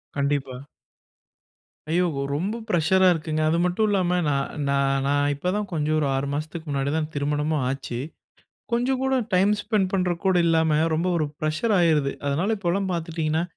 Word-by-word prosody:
கண்டிப்பா. 140 -2 -1 1.3
ஐயோ 180 +2 +3 0.3
ரொம்ப 190 +9 -2
பிரஷரா 185 +1 +3
இருக்குங்க 155 -1 -2
அது 165 - +2
மட்டும் 195 +5 +1
இல்லாம, 185 -3 +1 0.2
நா-நா 140 0 -1 0.3
நான் 145 +1 +2
இப்பதான் 185 +8 -2
கொஞ்சம் 155 0 0
ஒரு 150 - +1
6 135 +1 -1
மாசத்துக்கு 155 +3 -5
முன்னாடிதான் 145 +3 -1
திருமணமும் 150 +1 -1
ஆச்சு. 130 -3 -4 0.7
கொஞ்சம் 250 +2 +1
கூட 265 0 +1 0.2
டைம் 195 +3 +4
ஸ்பெண்ட் 205 -3 0
பண்றதுக்கு 180 -1 -1
கூட 190 - +3
இல்லாம 160 -2 +3 0.2
ரொம்ப 165 +3 0
ஒரு 160 - +1
பிரஷர் 155 +9 0
ஆயிருது. 155 -5 +2
அதனால 175 +11 +1
இப்பலாம் 190 0 -1
பார்த்துட்டீங்கன்னா 160 -1 -1
160 Hz, 140 wpm, -24 LUFS, 145-185 Hz, 1.3 s, டைம்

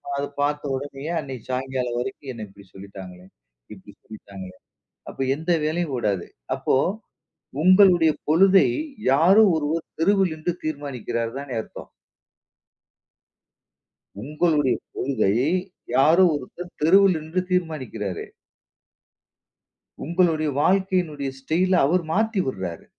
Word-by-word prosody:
அத 140 0 -2 0.2
பாத்த 145 +1 0
உடனேயே 140 +3 -6
அன்னைக்கு 135 -5 -7
சாயங்காலம் 130 -2 -2
வரைக்கும் 130 +2 -6
என்னை 115 -2 -7
இப்படி 100 +1 -17
சொல்லிட்டாங்களே, 95 -2 -11 0.5
இப்படி 100 0 -14
சொல்லிட்டாங்களே. 95 -3 -11 0.5
அப்போ - - -7
எந்த 160 +4 -3
வேலையும் 155 -1 -1
ஓடாது. 100 -6 -1 0.3
அப்போ - - 0 0.9
உங்களுடைய 185 -3 +6 0.2
பொழுதை 190 +4 +5 0.4
யாரோ 175 +10 +5
ஒருவர் 160 +2 -2 0.2
தெருவில் 190 0 +2
நின்னு 160 +3 -3
தீர்மானிக்குறார் 125 -6 -4
தானே 140 -1 -7
அர்த்தம். - - -12 2.3
உங்களுடைய 150 0 +1 0.2
கொள்கை 115 -8 0 0.6
யாரோ 160 +8 +5
ஒருத்தர் 165 +5 -7
தெருவில் 190 +4 +5
நின்று 160 +4 -3
தீர்மானிக்குறாரே. 130 - -3 1.8
உங்களுடைய 165 -2 +1
வாழ்க்கையினுடைய 180 -6 0
ஸ்டைல 170 +7 0
அவர் 175 +3 +1
மாத்தி 220 +3 0
விடுறாரு. 95 -9 -5
150 Hz, 100 wpm, -23 LUFS, 125-175 Hz, 2.3 s, உங்களுடைய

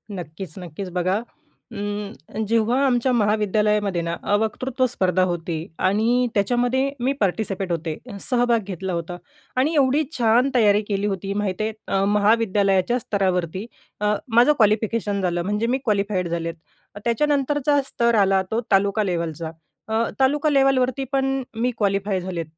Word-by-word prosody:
नक्कीच-नक्कीच. 175 +2 -7
बघा, 185 +4 0 0.5
उम्म, 205 -2 -5
जेव्हा 230 +5 +2
आमच्या 255 -1 +2
महाविद्यालयामध्ये 210 -3 +1
ना, 170 0 -2
अ, 205 - +2
वक्तृत्व 255 +4 -1
स्पर्धा 185 -5 +1
होती 170 -1 -3 0.3
आणि 235 +5 +2
त्याच्यामध्ये 245 +5 +1
मी 255 +3 +1
पार्टिसिपेट 195 -1 -1
होते, 165 -2 -2 0.2
सहभाग 245 -2 +2
घेतला 190 0 -4
होता 170 +1 -4 0.4
आणि 275 +6 +2
एवढी 285 +2 +3
छान 240 +3 +3
तयारी 210 -3 +4
केली 200 0 0
होती 195 0 -3
माहीत 195 -1 -2
आहे. 215 +1 0 0.2
अ, 195 0 +1
महाविद्यालयाच्या 205 0 +2
स्तरावरती, 185 -3 -1 0.4
अ, 210 0 +2 0.2
माझं 245 +6 +6
क्वालिफिकेशन 215 -1 +1
झालं 175 -2 0
म्हणजे 210 +4 -1
मी 255 - +1
क्वालिफाईड 200 -4 0
झाले. 165 0 -2 0.5
त्याच्यानंतरचा 285 +3 +2
स्तर 235 -3 +1
आला 195 -2 +4
तो 225 - 0
तालुका 200 +2 +3
लेवलचा. 170 -3 -3 0.4
अ, 220 +1 +1 0.2
तालुका 285 +3 +3
लेव्हलवरती 270 -2 +2
पण 270 -1 0
मी 235 +3 0
क्वालिफाय 200 -2 0
झाले. 175 -2 -4
210 Hz, 135 wpm, -22 LUFS, 190-245 Hz, 0.5 s, माझं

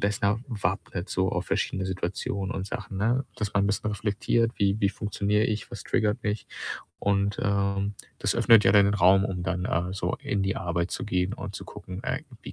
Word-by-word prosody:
besser 100 +1 +1
wappnet 95 -4 -2
so 95 0 +1
auf - - -2
verschiedene 95 0 -1
Situationen 95 +1 -2
und 95 0 -3
Sachen, 100 -3 -5
ne? 120 +6 +2
Dass 105 -2 -2
man 100 0 +4
bisschen 105 +1 0
reflektiert, 110 +3 +1
wie 100 +1 +2
wie 100 - +4
funktioniere 105 0 0
ich? 110 -1 -2
Was 120 - -7
triggert 110 +1 +1
mich? 105 0 -1 0.5
Und, 100 0 +1
ähm, 100 0 +1 0.2
das - - 0
öffnet 115 -2 +6
ja 95 - +6
dann 100 -1 +7
den 100 - +2
Raum, 95 0 +5
um 90 -3 -3
dann, 90 -1 -1
äh, 90 +2 0
so 95 - -1
in 100 -1 -1
die 95 0 0
Arbeit 85 -1 -1
zu - - -3
gehen 90 -1 0
und 100 -4 -7
zu - - -6
gucken, 90 0 -8
äh, - - -1 0.2
wie - - -8
100 Hz, 200 wpm, -27 LUFS, 95-105 Hz, 0.5 s, dann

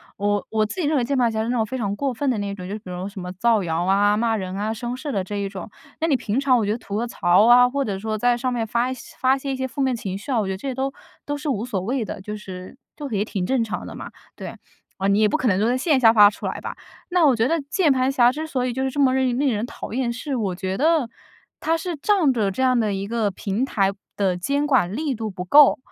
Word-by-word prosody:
我 205 0 -1
我 215 -1 +1
自 290 - -6
己 305 - 0
认 305 - +1
为 250 - +2
键 275 +2 -1
盘 240 -2 +3
侠 220 0 -1
是 230 - -3
那 245 - 0
种 220 - +1
非 260 +4 -5
常 205 -4 -2
过 275 -3 -1
分 275 +3 -1
的 240 - 0
那 200 -1 -3
种， 180 -2 -8
就 - - -4
比 215 - -9
如 180 +2 -5
什 195 -1 -9
么 180 0 -6
造 220 +2 +2
谣 165 +1 -1
啊、 200 +2 +3
骂 225 0 +1
人 185 -1 -5
啊、 215 +2 -2
生 240 +2 -4
事 285 +2 -5
的 195 - 0
这 205 - -5
一 200 -1 -2
种。 195 +1 -8 0.3
那 325 - +1
你 285 - +3
平 230 +1 -1
常 265 -3 +3
我 225 - +1
觉 205 - 0
得 225 - -1
吐 200 -3 -7
个 230 +3 0
槽 190 -2 +3
啊， 245 +1 +7
或 280 +1 -1
者 195 -4 -3
说 215 +1 -3
在 245 +2 +2
上 255 +1 -1
面 230 -2 -1
发 235 +3 0
一 - - -2
些 250 - -12
发 265 +1 +3
泄 275 0 -4
一 - - -1
些 260 0 -2
负 275 +3 -5
面 260 -1 +2
情 195 -4 -4
绪 210 +7 -7
啊， 240 - +2
我 205 - 0
觉 - - -2
得 - - -5
这 270 +7 -5
些 - - -3
都 265 +1 -2 0.3
都 290 0 -3
是 295 +1 -4
无 230 -3 -1
所 200 -7 -3
谓 235 +3 -2
的， 190 - -7
就 210 +2 -6
是 185 +2 -9 0.2
就 290 -2 -6
也 210 -1 -1
挺 195 -5 -3
正 260 +2 +1
常 225 - -3
的 - - -8
嘛， - - -8 0.3
对。 - - -7 0.4
哦， 195 - 0
你 200 +1 +3
也 215 -1 +4
不 310 - +1
可 260 - -1
能 190 -2 +2
说 235 +4 +2
线 280 -1 +2
下 225 -2 +7
发 210 -2 +8
出 - - -6
来 - - -4
吧。 - - -6 0.3
那 355 -2 +2
我 260 - +4
觉 225 +2 +2
得， 330 - +2
那 - - -7
键 330 -6 +3
盘 260 0 +2
侠 245 -2 +4
之 310 +3 -5
所 255 -4 -1
以 245 - -2
就 265 +1 -2
是 265 - 0
这 285 - -5
么 260 -2 +4
硬 255 -2 +1
令 275 -3 +2
人 210 +1 -2
讨 - - -8
厌， 245 -2 0
是 270 +3 -4
我 200 -6 -1
觉 190 0 -3
得 310 -2 +2 0.5
他 325 +1 +1
是 340 0 -4
仗 340 -6 +2
着 210 -4 +1
这 260 +7 -2
样 255 -2 +3
的 215 -2 +1
一 195 +1 -3
个 225 -2 0
平 200 +5 -3
台 195 -7 +1 0.2
的 190 -3 +1
监 280 +11 -1
管 225 -9 +2
力 295 -1 -1
度 220 -2 -4
不 180 -2 -6
够， 290 +8 +7
235 Hz, 330 characters per minute, -22 LUFS, 205-265 Hz, 0.5 s, 发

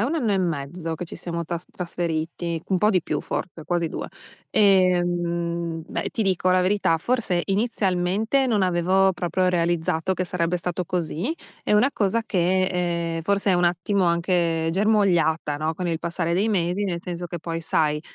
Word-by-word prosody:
è - - +2
1 290 - -1
anno 240 -10 +1
e 195 - +2
mezzo 165 -1 -2
che 175 - -5
ci 170 - -9
siamo 170 -1 -4
tras 170 +1 -5
trasferiti, 170 -1 -3
un 190 - +2
po' 210 +3 +3
di 185 -5 +2
più - - -2
forte, 170 -3 -5
quasi 170 -1 0
2. - - -5 0.4
E, 185 -3 +4
mhmm, 170 -1 -2
beh - - -3
ti 225 - -2
dico 185 -2 +1
la 185 0 +4
verità: 190 -3 +2
forse, 190 -2 0
inizialmente, 205 +3 +1
non 215 -5 +2
avevo 185 +2 +3
proprio 185 +1 0
realizzato 170 0 0
che 185 - -1
sarebbe 170 0 -1
stato 180 +1 -3
così. 180 - -2 0.3
È - - 0
una 215 +7 +4
cosa 215 +2 +1
che, 185 -2 +1 0.5
ehm, - - -2
forse 200 +4 +1
è - - +4
un 175 0 +2
attimo 180 +3 +1
anche 170 -1 +1
germogliata, 180 -7 +2
no, 155 +1 -1
con 180 +2 -3
il 165 -1 -1
passare 170 0 -2
dei 195 +6 +2
medi. 185 -1 0
Nel 175 -3 -2
senso 175 -1 -5
che 175 0 -6
poi, 165 +1 -4
sai, 150 -2 +1
175 Hz, 185 wpm, -24 LUFS, 170-195 Hz, 0.5 s, E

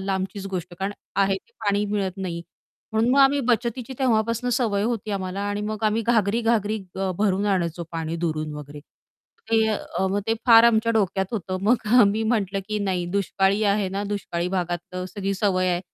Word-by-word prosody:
लांबचीच 195 0 -3
गोष्ट, 180 -2 -4
कारण 195 +1 -2 0.2
आहे 195 -1 +3
ते 215 - -15
पाणी 205 0 +2
मिळत 200 -3 -1
नाही. 170 -3 -4 0.5
म्हणून 225 +2 +2
मग 270 - +3
आम्ही 275 +1 +5
बचतीची 240 +1 0
तेव्हापासून 230 -1 +1
सवय 225 -5 +1
होती 225 -1 -2
आम्हाला. 195 -1 -3
आणि 205 0 -2
मग 215 0 -4
आम्ही 215 +2 +2
घागरी-घागरी 220 -1 +2 0.2
अ, 190 0 -1
भरून 200 -1 +1
आणायचो 175 -3 0
पाणी 165 0 -3
दुरून 155 -1 -2
वगैरे. 150 0 -9
मग 460 - -25
ते 220 -1 +4
अ, 200 -2 -2
मग 200 +1 0
ते 225 - +2
फार 230 -1 +8
आमच्या 230 0 +4
डोक्यात 195 -3 +1
होतं 185 -4 -3
मग 225 +2 +2
आम्ही 210 +1 +3
म्हटलं, 200 -4 0
की 215 - -1
नाही 185 -2 -1
दुष्काळी 200 +1 +1
आहे 205 -2 0
ना, 195 +2 -3
दुष्काळी 175 -3 -3
भागात 175 -1 -3
अ, 180 0 -3
सगळी 195 -1 -2
सवय 185 -2 +1
आहे. 175 0 0
200 Hz, 185 wpm, -24 LUFS, 185-220 Hz, 0.5 s, फार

